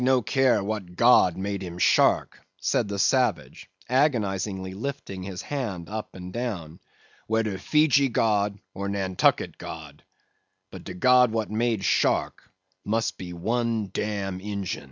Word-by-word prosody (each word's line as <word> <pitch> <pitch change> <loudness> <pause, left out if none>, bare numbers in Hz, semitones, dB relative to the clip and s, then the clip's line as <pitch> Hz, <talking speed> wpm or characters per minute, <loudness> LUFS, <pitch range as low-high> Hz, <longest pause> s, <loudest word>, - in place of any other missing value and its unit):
"Queequeg 130 +1 +3
no 125 - +2
care 130 -6 +2
what 100 -4 -4
god 115 -6 +5
made 100 +1 -3
him 90 -2 -7
shark," - - +3 0.2
said - - 0
the 100 0 -4
savage, 125 +1 0 0.2
agonizingly 100 - 0
lifting 115 -3 -5
his 90 -1 -6
hand 105 - -4
up 110 +2 -6
and 90 0 -8
down; 95 -9 -4 0.5
"wedder 110 -3 0
Fejee 140 +2 +3
god 105 -3 +1 0.2
or 100 0 -4
Nantucket 95 -2 +1
god; 75 -3 -9 0.7
but - - -9
de 90 - -8
god 125 +4 +5
wat 110 -1 -2
made 110 -2 0
shark - - +1 0.3
must 110 +2 -1
be 90 -2 -7
one 110 +3 -1
dam 100 -3 -3
Ingin." 100 -2 -4
105 Hz, 140 wpm, -26 LUFS, 95-120 Hz, 0.7 s, god